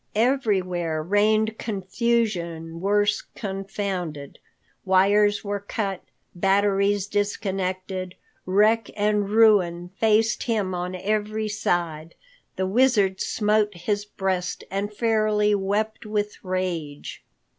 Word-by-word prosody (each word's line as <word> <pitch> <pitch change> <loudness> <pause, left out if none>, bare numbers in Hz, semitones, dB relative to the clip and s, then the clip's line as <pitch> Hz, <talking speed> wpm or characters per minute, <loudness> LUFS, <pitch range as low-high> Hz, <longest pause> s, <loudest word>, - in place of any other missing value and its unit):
Everywhere 185 - +1
reigned 215 +4 +2
confusion 190 -6 -1
worse 205 +2 +2
confounded. 195 -7 -4 0.4
Wires 205 +2 +3
were 205 0 -2
cut, 200 -2 -3 0.3
batteries 200 +1 +2
disconnected, 190 -2 -2 0.3
wreck 210 +3 +3
and 205 -1 +1
ruin 195 -6 +4
faced 220 0 +3
him 210 -6 -1
on 180 +1 -3
every 215 +3 -1
side. 170 -6 -2 0.4
The 190 - -1
Wizard 205 -3 +2
smote 210 -1 +1
his 205 +4 -1
breast 190 -3 -3
and 200 +2 -2
fairly 215 -1 +2
wept 205 +2 -1
with 210 -1 -3
rage. 180 -6 -4
200 Hz, 95 wpm, -24 LUFS, 185-215 Hz, 0.4 s, ruin